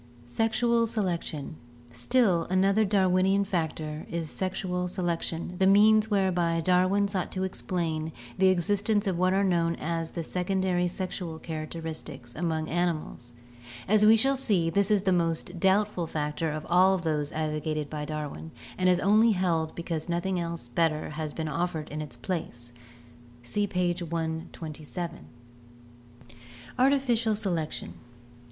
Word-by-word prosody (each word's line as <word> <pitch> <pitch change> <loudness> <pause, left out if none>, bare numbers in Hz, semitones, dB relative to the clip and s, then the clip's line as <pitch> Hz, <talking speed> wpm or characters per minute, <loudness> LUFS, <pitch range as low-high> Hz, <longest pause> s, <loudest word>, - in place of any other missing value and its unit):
Sexual 230 - +1
Selection. 170 -8 -3 0.2
— - - -22 0.2
Still 200 - +2
another 195 +4 +3
Darwinian 190 0 +3
factor 160 -5 -3
is 165 -2 -3
sexual 185 -1 -2
selection, 175 -1 -3
the 190 - +4
means 215 +2 +5
whereby 180 -5 +1
Darwin 185 +4 +3
sought 195 -3 -2
to 185 - -2
explain 165 -4 -2 0.2
the 190 - +4
exist 190 +3 +1
ence 210 -1 +3
of 185 -3 -1
what 185 0 +3
are 195 +1 +2
known 170 -3 +2
as 165 0 -3
the 170 - -5
secondary 180 0 0
sexual 175 -2 -4
characteristics 155 -6 -7
among 160 -1 -2
animals. 160 -8 -2 0.5
As 215 +1 +4
we 215 +1 +8
shall 270 +5 +3
see, 200 -11 +1
this 200 +3 +2
is 205 -3 +3
the 190 - +2
most 170 +1 -1
doubtful 190 -2 +2
factor 150 +1 -2
of 155 0 -5
all 185 +2 +5
of 180 - -4
those 150 -3 -1
advocated 155 -1 -2
by 150 0 -5
Darwin 150 +1 -5 0.3
and 185 0 +4
is 180 -1 +4
only 215 +3 +5
held 170 -4 0
because 170 -1 -4
noth 170 +1 -1
ing 185 -2 0 0.3
better 155 +1 +1
has 155 0 -4
been 160 +1 -4
offered 165 -1 -2
in 155 +1 -4
its 140 -6 -8
place 120 -6 -5 0.7
(see 205 +12 -1
page 180 -2 0
127). 160 0 -5 1.5
Artificial 250 -5 +3
Selection. 165 - -3
175 Hz, 140 wpm, -28 LUFS, 160-195 Hz, 1.5 s, we